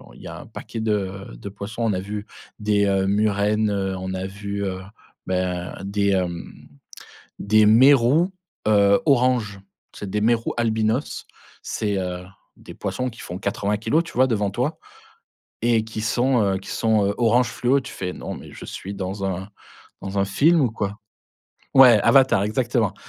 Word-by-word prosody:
il -, -, -15 dB
y -, -, -9 dB
a -, -, -8 dB
un -, -, -13 dB
paquet 115 Hz, -, -8 dB
de 100 Hz, -3 st, -2 dB
de 80 Hz, +12 st, -8 dB
poissons. 105 Hz, +4 st, -6 dB
On 110 Hz, -2 st, +1 dB
a 90 Hz, -, -1 dB
vu 105 Hz, +2 st, -5 dB, 0.3 s
des, 105 Hz, -1 st, +2 dB
heu, 95 Hz, -1 st, +1 dB
murènes, 105 Hz, +1 st, +1 dB
heu, 95 Hz, -2 st, -1 dB
on 95 Hz, 0 st, -5 dB
a 95 Hz, 0 st, -3 dB
vu, 100 Hz, +1 st, -5 dB
heu, 95 Hz, -1 st, -4 dB, 0.5 s
ben, 90 Hz, -1 st, -2 dB
des, 100 Hz, +1 st, 0 dB
hem, 90 Hz, -3 st, -2 dB, 0.9 s
des 110 Hz, +1 st, +4 dB
mérous, 135 Hz, -, +5 dB, 0.3 s
heu, 100 Hz, -2 st, +4 dB
orange. 125 Hz, -7 st, +2 dB, 0.4 s
C'est 100 Hz, -, -6 dB
des 105 Hz, -, -1 dB
mérous 115 Hz, +2 st, +1 dB
albinos. 110 Hz, +2 st, -1 dB, 0.4 s
C'est, 105 Hz, -2 st, -2 dB
heu, 90 Hz, -1 st, -4 dB, 0.3 s
des -, -, -12 dB
poissons 130 Hz, 0 st, -3 dB
qui 115 Hz, -, -14 dB
font 90 Hz, -, -6 dB
80 100 Hz, +1 st, -1 dB
kilogrammes 150 Hz, +10 st, +1 dB
tu -, -, -10 dB
vois, 130 Hz, +1 st, +4 dB
devant 105 Hz, -5 st, 0 dB
toi. 125 Hz, +10 st, -2 dB, 0.9 s
Et 115 Hz, -2 st, +3 dB
qui 110 Hz, -1 st, -6 dB
sont, 120 Hz, +2 st, +2 dB
heu, 95 Hz, -2 st, +1 dB
qui 95 Hz, -, -13 dB
sont, 110 Hz, -3 st, +2 dB
heu, 100 Hz, -, 0 dB
orange 120 Hz, +1 st, +3 dB
fluo, 130 Hz, +3 st, +1 dB
tu 130 Hz, -, -9 dB
fais: 90 Hz, -1 st, -4 dB
«Non -, -, -6 dB
mais -, -, -11 dB
je -, -, -10 dB
suis 100 Hz, -, -7 dB
dans 95 Hz, +1 st, -4 dB
un 95 Hz, +1 st, -3 dB, 0.5 s
dans 100 Hz, +1 st, -4 dB
un 100 Hz, -, +3 dB
film 155 Hz, -, +3 dB
ou 130 Hz, -5 st, +2 dB
quoi?» 105 Hz, -1 st, -4 dB, 0.8 s
Ouais, 125 Hz, -5 st, +8 dB
Avatar, 130 Hz, -7 st, +4 dB
exactement. 115 Hz, 0 st, 0 dB
105 Hz, 175 wpm, -23 LUFS, 100-115 Hz, 0.9 s, Ouais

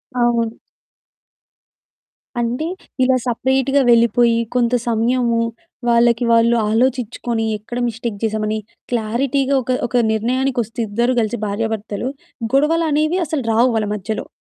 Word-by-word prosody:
అవును. 235 Hz, -2 st, +1 dB, 1.8 s
అంటే 245 Hz, +7 st, -1 dB, 0.4 s
ఇలా 255 Hz, 0 st, +3 dB
సెపరేట్‌గా 265 Hz, +3 st, +1 dB
వెళ్ళిపోయి, 235 Hz, 0 st, +4 dB, 0.2 s
కొంత 240 Hz, -1 st, +2 dB
సమయము 235 Hz, +1 st, +1 dB, 0.5 s
వాళ్ళకి, 235 Hz, 0 st, +3 dB
వాళ్ళు 230 Hz, +1 st, +4 dB
ఆలోచిచ్చుకొని, 235 Hz, -1 st, 0 dB
ఎక్కడ 215 Hz, +3 st, -8 dB
మిస్టేక్ 225 Hz, -2 st, -4 dB
జేసామని 215 Hz, 0 st, -1 dB, 0.3 s
క్లారిటీగా 260 Hz, +4 st, 0 dB
ఒక, 255 Hz, -, -2 dB, 0.2 s
ఒక 240 Hz, 0 st, +1 dB
నిర్ణయానికొస్తే 240 Hz, +1 st, -1 dB
ఇద్దరు 235 Hz, +5 st, +1 dB
గలిసి 225 Hz, +2 st, -2 dB
భార్యాభర్తలు 220 Hz, +2 st, -3 dB, 0.4 s
గొడవలనేవి 310 Hz, +3 st, +2 dB
అసలు 290 Hz, -3 st, -2 dB
రావు 240 Hz, +3 st, +4 dB
వాళ్ళ 215 Hz, -1 st, 0 dB
మధ్యలో. 215 Hz, +2 st, -4 dB
235 Hz, 105 wpm, -19 LUFS, 225-255 Hz, 1.8 s, వెళ్ళిపోయి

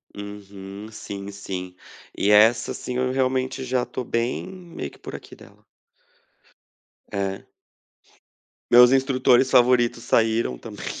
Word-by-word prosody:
Uhum, 100 Hz, 0 st, -9 dB
sim, 100 Hz, -1 st, -7 dB
sim. 90 Hz, -2 st, -7 dB, 0.4 s
E 100 Hz, -, +1 dB
essa 110 Hz, +3 st, +5 dB
sim, 125 Hz, 0 st, -5 dB
eu 130 Hz, 0 st, 0 dB
realmente 130 Hz, 0 st, -1 dB
já 125 Hz, -1 st, 0 dB
tô 130 Hz, -, -5 dB
bem 115 Hz, +5 st, -2 dB
meio 180 Hz, -2 st, -8 dB
que -, -, -19 dB
"por -, -, -8 dB
aqui" -, -, -11 dB
dela. -, -, -18 dB, 1.5 s
É. 100 Hz, -1 st, -3 dB, 1.3 s
Meus 125 Hz, +1 st, +8 dB
instrutores 130 Hz, -1 st, +3 dB
favoritos 120 Hz, -1 st, +3 dB
saíram 110 Hz, -, +1 dB
também. -, -, -9 dB
120 Hz, 120 wpm, -23 LUFS, 100-130 Hz, 1.5 s, Meus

